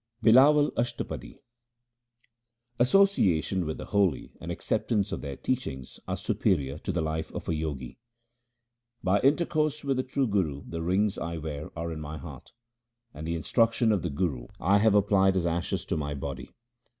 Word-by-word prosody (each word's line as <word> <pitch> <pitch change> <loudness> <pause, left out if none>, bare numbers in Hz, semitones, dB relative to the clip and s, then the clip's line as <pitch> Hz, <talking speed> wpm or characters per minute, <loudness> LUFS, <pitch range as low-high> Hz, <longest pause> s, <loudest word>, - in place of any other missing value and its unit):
BlLAWAL 145 +6 +6
ASHTAPADI 120 0 -3 1.4
Association 100 - +3
with 80 - -3
the - - -7
holy 100 -8 +1
and - - -5
acceptance 105 -3 -1
of - - -3
their 70 -2 -5
teachings 70 - -4
are - - -2
superior 70 -5 0
to - - -3
the 90 - -1
life 80 0 -3
of - - -5
a - - 0
Jogi: 75 -6 -4 0.5
— 120 0 -53
By 95 +2 +3
intercourse 155 +1 +1
with 135 -2 0
the - - +2
true 130 +1 0
Guru 90 - -1
the 85 -1 -5
rings 95 +4 +1
I 85 0 -4
wear 75 -1 -5
are 85 +1 -3
in 80 - -5
my 75 +1 -6
heart, 75 -5 -10 0.6
and 80 +1 -7
the 85 - -1
instruction 115 +6 +2
of 100 -4 +1
the - - -2
Guru 70 -5 -2
I 100 +5 +4
have 110 0 +4
applied 95 -2 +4
as 90 - 0
ashes 85 0 -1
to - - -2
my 75 -1 -3
body. 70 - -6
95 Hz, 170 wpm, -28 LUFS, 80-120 Hz, 1.4 s, BlLAWAL